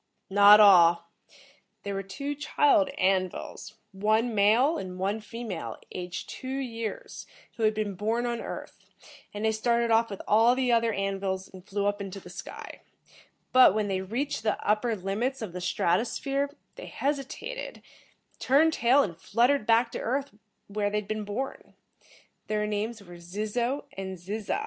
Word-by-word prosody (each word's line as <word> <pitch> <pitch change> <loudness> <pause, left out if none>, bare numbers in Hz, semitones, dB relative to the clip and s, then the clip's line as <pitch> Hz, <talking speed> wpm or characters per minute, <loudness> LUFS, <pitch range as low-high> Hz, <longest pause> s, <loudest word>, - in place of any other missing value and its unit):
"Not 205 +1 +8
all. 170 -4 +6 0.7
There 200 - -4
were 195 - -2
two 280 +10 -5
child 290 -7 +2
An 185 -1 +2
vils, 210 +3 -9 0.2
one 215 +4 +1
male 230 +10 +3
and 185 -1 -7
one 195 +4 -1
female, 215 -4 -6
aged 180 -1 -6
two 260 - -8
years, 230 -5 -5 0.3
who - - -8
had 215 -1 +3
been 210 -2 -2
born 220 +5 -1
on 235 -1 -2
Earth, - - -8 0.5
and 210 +1 -4
they 220 - +3
started 235 +1 +1
off 230 +1 +3
with 200 - -7
all 225 +3 +5
the 255 -1 +1
other 230 -1 +3
An 195 -1 -2
vils 190 -1 -3
and 185 -1 -13
flew 200 +1 -3
up 205 0 0
into 195 0 -6
the 180 - -13
sky. 185 - -9 0.7
But 255 -6 +7
when 210 -1 0
they 190 -1 -1
reached 235 +8 -3
the 215 -1 0
upper 215 +2 +1
limits 215 +8 -2
of 215 -6 -6
the 180 - -5
strato 180 +2 +1
sphere, 275 +3 -2 0.3
they - - -8
hesitated, 290 - -4 0.6
turned 310 +5 +4
tail 255 +3 +4
and 170 -8 -4
fluttered 235 +8 +1
back 230 +1 +3
to - - -5
Earth 275 +3 -2 0.3
where 205 0 -2
they 210 - -1
had 210 -1 -4
been 215 0 -3
born. 235 +7 -5 0.7
Their 210 0 0
names 210 +1 -3
were 175 -2 -12
Zizzo 215 +9 -2
and 190 -1 -5
Zizza." 205 - -3
215 Hz, 170 wpm, -27 LUFS, 195-240 Hz, 0.7 s, Not